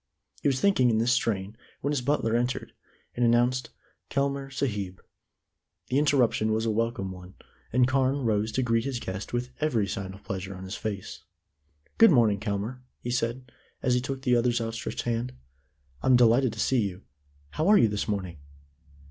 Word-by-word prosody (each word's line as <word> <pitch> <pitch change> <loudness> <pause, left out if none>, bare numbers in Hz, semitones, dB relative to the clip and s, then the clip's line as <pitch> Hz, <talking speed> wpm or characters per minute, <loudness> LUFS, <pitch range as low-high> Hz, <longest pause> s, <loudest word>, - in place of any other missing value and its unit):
He - - +1
was 135 -2 +2
thinking 160 -11 +4
in 110 - +2
this 115 +2 +2
strain 105 -4 0 0.3
when 140 - -1
his 140 - 0
butler 125 -4 +1
entered, 125 +2 -1 0.4
and 120 - 0
announced 120 +2 +2 0.4
"Kelmare 140 0 -1
Sahib." 105 -9 -3 0.9
The 130 - +2
interruption 125 -7 +2
was 110 +1 0
a 115 - +1
welcome 110 -3 -1
one, 90 0 -11 0.4
and 125 +1 +4
Carne 135 +1 +1
rose 110 -1 +1
to 130 - +1
greet 115 -1 +1
his 135 -3 -3
guest 95 -1 -5
with 125 +1 -2
every 135 -9 +1
sign 95 -2 -5
of 100 - -16
pleasure 95 0 -5
on 95 - -9
his 95 +1 -6
face. 100 -2 -5 0.7
"Good 225 - +9
morning, 115 - +4
Kelmare," 105 +5 -3 0.2
he 120 - -4
said, 120 +1 -2 0.3
as 125 - +2
he 125 - +2
took 135 +1 -5
the 125 -2 +3
other's 120 0 +2
outstretched 115 0 -4
hand; 120 +1 -2 0.7
"I'm 130 - +4
delighted 120 0 +4
to 110 - -9
see 130 +2 +2
you. 100 -2 -4 0.5
How 155 - -1
are 210 +1 +7
you 115 - +5
this 105 +1 -2
morning?" 95 -6 -3
120 Hz, 180 wpm, -27 LUFS, 105-130 Hz, 0.9 s, Good